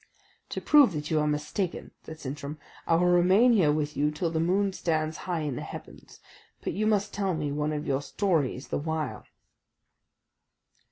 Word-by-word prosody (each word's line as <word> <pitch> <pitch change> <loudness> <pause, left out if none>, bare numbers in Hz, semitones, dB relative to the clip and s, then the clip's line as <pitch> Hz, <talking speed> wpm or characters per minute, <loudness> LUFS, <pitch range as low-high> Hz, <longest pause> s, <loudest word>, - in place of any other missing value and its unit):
"To - - -3
prove 285 - +5
that 150 0 -4
you 155 - +3
are 150 - +1
mistaken," 150 +5 -2
said 160 0 -10
Sintram, 140 +2 -6 0.3
"I 165 - +4
will 175 +2 +3
remain 185 +7 +5
here 175 -9 +4
with 150 0 -1
you 150 +1 +2
till 155 +2 -2
the 160 - -1
moon 190 +4 +1
stands 155 -3 -1
high 170 -3 0
in 145 -4 -2
the - - -5
heavens. - - -10 0.4
But - - -2
you 215 +2 0
must 205 -1 +1
tell 195 -3 -1
me 150 -2 -2
one 150 +1 -1
of 150 0 -3
your 135 0 0
stories 150 -6 -1
the - - -1
while." 155 -1 -3
160 Hz, 180 wpm, -28 LUFS, 150-185 Hz, 0.4 s, prove